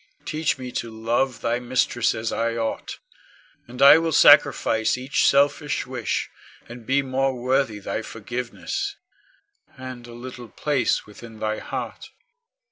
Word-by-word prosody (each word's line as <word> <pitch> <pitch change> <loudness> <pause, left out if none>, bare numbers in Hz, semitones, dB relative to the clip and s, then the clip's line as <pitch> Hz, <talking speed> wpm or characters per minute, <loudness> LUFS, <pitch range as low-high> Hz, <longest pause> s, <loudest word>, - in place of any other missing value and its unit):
Teach 155 -2 -1
me 125 -1 -7
to 120 - -4
love 115 +3 -1
thy 120 +1 0
mistress 125 -1 0
as 110 0 -3
I 115 0 -1
ought, 115 -1 -3 0.7
and 125 +3 -2
I 140 +3 +9
will 165 0 -1
sacrifice 110 -5 +5
each 130 +3 +1
selfish 145 +1 +2
wish, 125 -3 -3 0.4
and 120 -1 -11
be 140 +1 +2
more 135 0 0
worthy 130 -2 +1
thy 100 - -4
forgiveness, 125 0 -5 0.8
and 130 -2 -8
a 120 - -11
little 120 0 -9
place 140 -6 0
within 110 +1 -12
thy 110 0 -2
heart. - - -6
125 Hz, 135 wpm, -23 LUFS, 115-135 Hz, 0.8 s, I